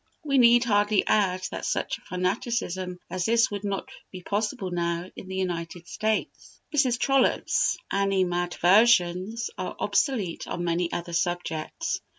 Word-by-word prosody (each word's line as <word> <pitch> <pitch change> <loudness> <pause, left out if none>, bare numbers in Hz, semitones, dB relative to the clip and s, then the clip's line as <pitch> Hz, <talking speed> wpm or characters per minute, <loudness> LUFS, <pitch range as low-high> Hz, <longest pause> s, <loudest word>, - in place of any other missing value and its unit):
We 275 -3 +2
need 240 0 +6
hardly 205 -2 +2
add 185 -3 +1
that - - -5
such - - -1
fanaticism 185 -1 -2
as 185 -1 -2
this 230 +1 +3
would 205 0 -4
not 200 +1 -3 0.2
be 185 -2 -10
possible 205 -2 -2
now 170 0 -2
in - - -9
the 190 - -6
United 175 -2 -4
States. 220 0 -3 0.2
Mrs. 255 -4 +3
Trollope's 270 +2 +2
animadversions 190 +2 +2
are - - -4
obsolete 220 - 0
on 175 - -3
many 170 0 0
other 170 0 -4
subjects. 175 - -2
190 Hz, 135 wpm, -26 LUFS, 175-230 Hz, 0.2 s, need